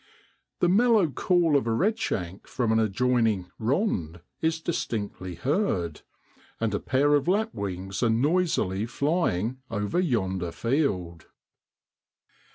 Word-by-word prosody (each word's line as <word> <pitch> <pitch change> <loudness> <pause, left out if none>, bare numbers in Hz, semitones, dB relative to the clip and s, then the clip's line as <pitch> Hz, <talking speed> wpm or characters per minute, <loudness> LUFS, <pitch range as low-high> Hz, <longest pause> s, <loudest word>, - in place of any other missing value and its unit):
The 175 - +4
mellow 215 -1 +4
call 175 -1 +2
of 135 -4 +2
a - - +1
redshank 115 - -1
from 120 -3 -1
an 110 - +3
adjoining 110 -3 +1
' - - -47
rond' 95 - 0 0.2
is 160 0 +1
distinctly 100 - -3
heard; 110 - -1 0.6
and 115 -2 0
a 100 - 0
pair 140 +3 +2
of 145 +1 +2
lapwings 100 - -2
are 120 - +3
noisily 120 - +1
flying 130 - 0
over 105 - -1
yonder 95 - 0
field. 90 - -1
115 Hz, 120 wpm, -26 LUFS, -, 0.6 s, The